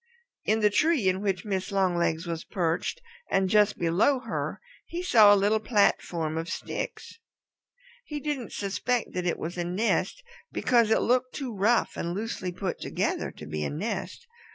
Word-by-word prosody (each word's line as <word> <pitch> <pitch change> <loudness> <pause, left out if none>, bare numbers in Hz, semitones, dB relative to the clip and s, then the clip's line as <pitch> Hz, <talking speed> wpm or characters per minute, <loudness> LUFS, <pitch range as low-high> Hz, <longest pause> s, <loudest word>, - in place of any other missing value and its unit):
In 220 +1 +2
the 210 -1 +4
tree 290 - +2
in 185 +1 +1
which 195 0 -1
Mrs. 195 -1 -2
Longlegs 175 -3 +1
was 165 -1 -4
perched 175 - -2 0.3
and 195 -1 +2
just 210 -1 +4
below 180 +11 +3
her 230 - -4 0.3
he 350 +1 -4
saw 220 - +7
a - - +8
little 205 +2 +2
platform 175 -7 +1
of 165 +1 -5
sticks. 320 - -5 0.9
He 300 -1 -5
didn't 285 -5 -3
suspect 220 +4 -2
that 180 -1 -2
it 175 - 0
was 175 +2 -5
a - - 0
nest, 205 - 0 0.3
because 235 -3 +3
it 220 - +3
looked 255 +1 +1
too 255 -6 -4
rough 215 +5 +2
and 170 +1 -3
loosely 205 -3 -3
put 185 +1 -4
together - - -1
to 75 - -11
be 75 0 -3
a - - -1
nest. 205 - -4
200 Hz, 170 wpm, -27 LUFS, 175-235 Hz, 0.9 s, a